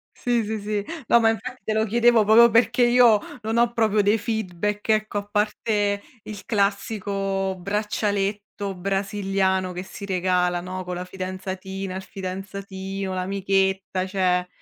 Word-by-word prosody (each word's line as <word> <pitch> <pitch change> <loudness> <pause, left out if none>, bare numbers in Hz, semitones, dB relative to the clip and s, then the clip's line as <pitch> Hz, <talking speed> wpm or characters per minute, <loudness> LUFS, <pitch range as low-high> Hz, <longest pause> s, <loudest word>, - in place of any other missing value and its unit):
Sì, 240 -2 0
sì, 215 +1 -3
sì. 205 0 -2 0.2
No, 235 - +6
ma 225 -1 +4
infatti 245 +2 -4
te 215 - -1
lo 220 0 +2
chiedevo 235 0 +4
proprio 230 +3 +7
perché 230 +2 +3
io 240 -3 +6 0.2
non 225 +1 -1
ho 235 0 +3
proprio 215 -2 +2
dei 205 +2 +3
feedback, 210 -1 -3
ecco, 215 -1 +1
a - - -6
parte 205 -1 0 0.2
il 205 -1 -8
classico 200 -2 -1
braccialetto 205 0 -2
brasiliano 195 -1 0
che 180 +1 -5
si 200 +1 -9
regala, 180 -1 +1
no, 185 +1 -5
con 180 0 -5
la 180 +1 -5
fidanzatina, 185 0 -5
il 190 - -4
fidanzatino, 195 0 -5
l'amichetta, 190 0 0
cioè, 180 -2 +1
200 Hz, 145 wpm, -24 LUFS, 190-215 Hz, 0.2 s, proprio